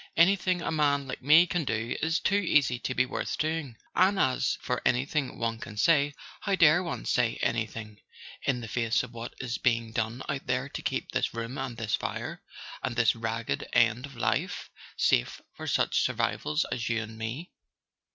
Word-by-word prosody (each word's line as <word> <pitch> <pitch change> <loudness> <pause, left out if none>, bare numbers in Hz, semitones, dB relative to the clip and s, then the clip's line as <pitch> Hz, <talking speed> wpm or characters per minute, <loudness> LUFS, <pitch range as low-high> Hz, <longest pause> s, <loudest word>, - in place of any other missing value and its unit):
Anything 180 0 +4
a - - -1
man 145 -3 +2
like 130 - -5
me 155 +6 +7
can 175 -1 -1
do 115 -3 -2
is 165 +2 +1
too - - 0
easy 150 -11 +3
to 130 - -3
be 125 - +3
worth 130 - -3
doing. 155 -6 -2 0.2
And 190 +2 +4
as 130 -6 +2
for - - -2
anything 135 +2 0
one 115 -1 -2
can 105 - -9
say: 145 +2 +3 0.2
how 200 -2 0
dare 170 -1 +6
one 170 -3 -4
say 125 -3 +2
anything, 110 -2 -2 0.4
in 130 -3 0
the 115 - -6
face 115 +1 +1
of 125 -1 -9
what 115 0 -7
is 120 -2 -3
being 115 -2 +1
done 115 +2 -2
out 135 - -3
there 125 +2 0
to - - -6
keep - - -2
this - - -1
room 115 +2 -4
and 125 -3 -4
this 110 -3 -3
fire, - - -3 0.4
and - - -2
this 115 -1 +4
ragged 115 0 -3
end 120 +3 +3
of 140 - -14
life, 115 -2 -1 0.3
safe - - +2
for - - -8
such - - +2
survivals 150 +1 0
as 120 -1 -2
you 115 -1 +1
and 110 0 -10
me?" 120 +11 -5
125 Hz, 190 wpm, -28 LUFS, 115-150 Hz, 0.4 s, me